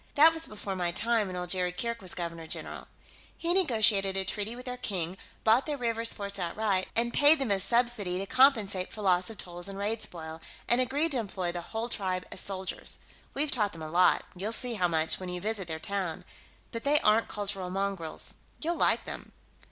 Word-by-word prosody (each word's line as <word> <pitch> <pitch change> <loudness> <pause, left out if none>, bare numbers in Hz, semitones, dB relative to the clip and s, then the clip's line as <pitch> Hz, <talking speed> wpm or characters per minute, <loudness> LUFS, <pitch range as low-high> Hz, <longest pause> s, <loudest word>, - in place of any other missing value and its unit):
That 320 +3 +8
was 325 0 +3
before 205 -2 -5
my 175 -2 0
time, 225 +4 +1
when 185 - -6
old 180 -1 -3
Jerry 180 -1 +1
Kirke 235 +5 -3
was 185 -2 -3
Governor 170 -2 -5
General. - - -4 0.5
He 340 +1 +1
negotiated 220 - +3
a 190 - -1
treaty 210 +3 -2
with 250 +1 -10
their 250 -1 -4
King, 185 -8 -3 0.3
bought 225 +6 +4
their 295 -1 -2
rievers' 230 -2 +1
forts 200 -1 -4
outright, 185 +2 0
and 235 +1 +2
paid 295 +2 +7
them 270 -7 -1
a 195 - +2
subsidy 235 -4 +1
to 195 - -3
compensate 220 -7 +3
for 215 - -7
loss 180 0 +3
of 225 - -9
tolls 175 0 -3
and 195 - -7
raid 215 +3 -2
spoil, 160 -1 -7 0.3
and 240 +1 +4
agreed 285 +6 0
to 265 - +1
employ 190 -5 -2
the 175 0 -4
whole 225 +6 -4
tribe 185 -5 0
as - - -3
soldiers. 190 -1 -2 0.4
We've 290 +1 0
taught 210 -5 +1
them 165 -1 -8
a 155 - -6
lot 180 +2 +4
you'll 200 +5 -3
see 245 +1 0
how 185 -5 +2
much 160 -1 +1
when 185 -1 -6
you 180 0 -3
visit 205 -1 -2
their 160 -1 -3
town 185 -1 -3 0.5
but 230 -1 -5
they 295 +1 +5
aren't 215 +2 +4
cultural 195 -3 -3
mongrels. 190 -4 -3 0.2
You'll 340 +2 -1
like - - +3
them." - - -8
200 Hz, 210 wpm, -29 LUFS, 180-235 Hz, 0.5 s, That